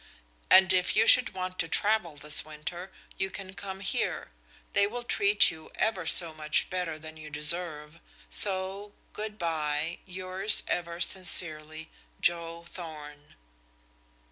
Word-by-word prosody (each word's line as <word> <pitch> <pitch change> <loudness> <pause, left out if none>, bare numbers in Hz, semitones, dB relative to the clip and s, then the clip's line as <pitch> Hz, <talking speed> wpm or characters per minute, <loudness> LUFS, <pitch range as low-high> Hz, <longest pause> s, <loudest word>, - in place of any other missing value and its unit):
And 190 0 +7
if 180 -1 +1
you 220 - +5
should 245 -4 +5
want 185 0 -6
to 165 - 0
travel 205 -4 -1
this 150 +1 +2
winter 155 +5 -8 0.3
you 190 - -1
can 190 -1 -9
come 195 -1 -8
here; 195 - -3 0.4
they 200 - +3
will 240 +3 -6
treat 205 -4 +3
you 160 -1 -12
ever 190 -6 -1
so 165 0 +1
much 155 +2 -1
better 180 -4 -3
than 155 0 -12
you 155 -1 -10
deserve. 150 0 0 0.3
So 195 +1 +1 0.2
good 210 0 -6
by. 160 -1 -2
Yours 185 +3 0
ever 170 0 -4
sincerely, 160 -4 +4 0.3
"JOE 170 0 -1
THORN." 150 -4 -11
175 Hz, 135 wpm, -28 LUFS, 155-190 Hz, 0.4 s, And